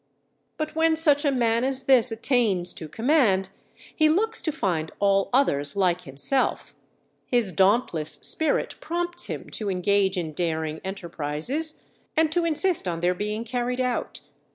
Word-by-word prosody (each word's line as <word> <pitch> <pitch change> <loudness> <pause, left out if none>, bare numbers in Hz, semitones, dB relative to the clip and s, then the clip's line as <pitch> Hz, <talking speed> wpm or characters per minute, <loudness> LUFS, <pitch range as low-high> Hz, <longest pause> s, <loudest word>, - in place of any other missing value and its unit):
_" - - -47 0.5
But 310 0 -4
when 320 0 +3
such 295 -3 +4
a 285 - +3
man 235 -2 +1
as 265 0 -1
this 255 -2 +4
attains 220 -7 +1
to 155 - -8
command, 225 - +2 0.4
he 310 -1 +4
looks 445 +8 +1
to 315 - -1
find 160 - -2
all 195 -1 +2
others 145 - +1
like 180 -3 +1
himself; 140 - -1 0.5
his 240 -6 +1
dauntless 190 -5 +1
spirit 315 - +2
prompts 345 +1 -3
him - - -7
to 210 -2 -3
engage 190 +1 +1
in 160 -3 -3
daring 160 -1 -3
enterprises, 190 - -2 0.3
and 315 -1 +3
to 345 0 +1
insist 335 - +1
on 165 -1 -3
their 180 +1 +2
being 210 +4 -3
carried 245 +1 -3
out. 250 -1 -2
225 Hz, 155 wpm, -25 LUFS, 180-290 Hz, 0.5 s, such